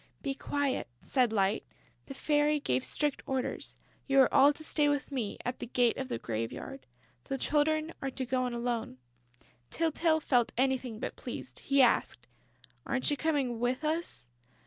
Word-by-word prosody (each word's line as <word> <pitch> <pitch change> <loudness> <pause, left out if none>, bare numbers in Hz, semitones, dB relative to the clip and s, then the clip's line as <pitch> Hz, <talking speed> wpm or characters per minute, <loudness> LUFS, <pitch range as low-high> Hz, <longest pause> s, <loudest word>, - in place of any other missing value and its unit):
"Be 275 -2 -1
quiet," 285 0 -1 0.2
said 250 -4 +2
Light. 200 -1 +1 0.4
"The 275 - -7
Fairy 295 +1 +2
gave 125 - 0
strict 295 -2 0
orders. 265 -1 -2 0.3
You 275 -1 +6
are 260 - +3
all 280 +1 +7
to 315 - -10
stay 300 -1 +2
with 290 0 -1
me, 240 -7 -2
at 245 - -3
the - - -5
gate 240 -1 +2
of 265 -1 -4
the - - -1
graveyard; 115 +4 -5 0.4
the 270 - -2
Children 310 +3 +1
are 270 - -1
to 260 0 -4
go 255 0 0
in 245 - -4
alone." 235 - -2 0.7
Tyltyl 325 0 +1
felt 245 -6 +2
anything 260 -3 0
but - - -4
pleased. - - -7
He 275 -1 +4
asked: 240 - +2 0.6
"Aren't 265 +2 0
you - - +2
coming 280 -6 0
with 250 +5 0
us?" 320 - -2
265 Hz, 170 wpm, -31 LUFS, 240-295 Hz, 0.7 s, all